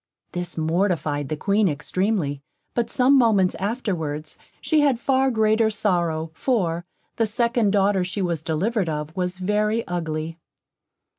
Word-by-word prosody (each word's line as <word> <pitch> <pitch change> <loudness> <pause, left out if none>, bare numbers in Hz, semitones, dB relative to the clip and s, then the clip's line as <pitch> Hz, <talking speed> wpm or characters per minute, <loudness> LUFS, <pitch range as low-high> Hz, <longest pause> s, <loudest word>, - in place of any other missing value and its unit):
This 175 -1 -5
mortified 160 -4 0
the 155 - -2
Queen 200 +4 +2
extreamly, 160 -1 -1 0.3
but 235 -1 0
some 260 +2 +4
moments 215 -8 +4
afterwards 170 - -3 0.2
she 315 - +2
had 280 -5 +3
far 265 +1 +2
greater 220 -1 +3
sorrow; 170 -6 0
for, 175 -6 0 0.3
the 225 - +2
second 235 0 +1
daughter 195 -1 +2
she 185 +3 -4
was 170 -4 -1
delivered 185 +5 -1
of, 150 0 -4
was 180 -1 -2
very 210 +4 0
ugly. 165 -1 -3
190 Hz, 135 wpm, -23 LUFS, 160-220 Hz, 0.3 s, some